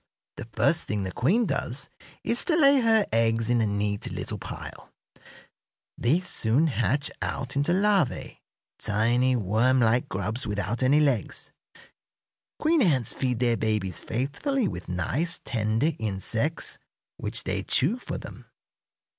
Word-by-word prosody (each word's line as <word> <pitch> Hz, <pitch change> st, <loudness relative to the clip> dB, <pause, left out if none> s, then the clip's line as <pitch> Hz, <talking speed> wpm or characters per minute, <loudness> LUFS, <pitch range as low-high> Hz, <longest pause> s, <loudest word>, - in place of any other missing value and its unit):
The -, -, -6 dB
first -, -, +2 dB
thing 105 Hz, -2 st, -2 dB
the 95 Hz, -, -4 dB
queen 185 Hz, -, +2 dB
does 135 Hz, -, -2 dB, 0.4 s
is 235 Hz, -, -1 dB
to 340 Hz, -, +2 dB
lay 280 Hz, -3 st, +5 dB
her 225 Hz, -3 st, +4 dB
eggs 115 Hz, 0 st, +2 dB
in 120 Hz, -1 st, +3 dB
a 110 Hz, -, +1 dB
neat 100 Hz, 0 st, -2 dB
little -, -, -4 dB
pile. -, -, -9 dB, 1.1 s
These 165 Hz, +10 st, +1 dB
soon 125 Hz, -1 st, +2 dB
hatch 130 Hz, -, 0 dB
out 135 Hz, 0 st, -3 dB
into 145 Hz, +4 st, +1 dB
larvæ; 195 Hz, -5 st, +1 dB, 0.4 s
tiny, 120 Hz, +5 st, +2 dB
worm 115 Hz, +5 st, +2 dB
like 120 Hz, +1 st, +2 dB
grubs 110 Hz, +7 st, -3 dB
without 105 Hz, +3 st, -2 dB
any 135 Hz, +3 st, +4 dB
legs. 135 Hz, -8 st, 0 dB, 1.1 s
Queen 315 Hz, 0 st, +2 dB
ants 135 Hz, -, +2 dB
feed 125 Hz, -2 st, -1 dB
their 120 Hz, -1 st, +2 dB
babies 105 Hz, -5 st, 0 dB
faithfully 195 Hz, -, -2 dB
with 90 Hz, -, -6 dB
nice, 130 Hz, -, +1 dB
tender 110 Hz, +6 st, 0 dB
insects, 110 Hz, +8 st, -1 dB, 0.4 s
which -, -, -3 dB
they -, -, -2 dB
chew 245 Hz, -, +1 dB
for -, -, -5 dB
them. -, -, -11 dB
125 Hz, 140 wpm, -26 LUFS, 110-160 Hz, 1.1 s, lay